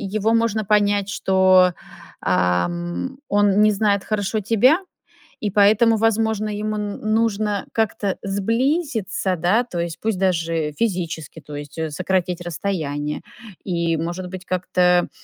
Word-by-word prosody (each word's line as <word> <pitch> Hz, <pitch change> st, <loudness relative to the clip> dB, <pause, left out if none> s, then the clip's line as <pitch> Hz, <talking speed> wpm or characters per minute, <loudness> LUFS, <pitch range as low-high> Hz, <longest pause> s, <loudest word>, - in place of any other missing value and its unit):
его 215 Hz, +2 st, +2 dB
можно 230 Hz, -2 st, +1 dB
понять, 205 Hz, -1 st, +2 dB
что, 185 Hz, -2 st, +4 dB, 0.5 s
ам, 175 Hz, -, -1 dB
он 205 Hz, 0 st, +3 dB
не 215 Hz, 0 st, +5 dB
знает 200 Hz, -1 st, +1 dB
хорошо 215 Hz, 0 st, -1 dB
тебя, 245 Hz, -, +4 dB, 0.6 s
и 210 Hz, -, -1 dB
поэтому, 215 Hz, +3 st, +5 dB
возможно, 220 Hz, -1 st, +1 dB
ему 210 Hz, +1 st, -3 dB
н 205 Hz, -1 st, -4 dB
нужно 215 Hz, -2 st, 0 dB
как-то 220 Hz, -3 st, -1 dB
сблизиться, 220 Hz, -, -1 dB
да, 180 Hz, +9 st, +2 dB
то 185 Hz, -8 st, -6 dB
есть 170 Hz, -1 st, -4 dB
пусть 220 Hz, -4 st, -1 dB
даже 165 Hz, -4 st, 0 dB
физически, 170 Hz, -6 st, -3 dB
то 150 Hz, -, -11 dB
есть, 145 Hz, +2 st, -9 dB
э, 160 Hz, -1 st, -2 dB
сократить 180 Hz, +2 st, -1 dB
расстояние 155 Hz, -5 st, -3 dB, 0.4 s
и, 170 Hz, -3 st, 0 dB
может 175 Hz, +3 st, -4 dB
быть, 185 Hz, 0 st, -8 dB
как-то, 180 Hz, -1 st, +2 dB
195 Hz, 130 wpm, -21 LUFS, 175-215 Hz, 0.6 s, не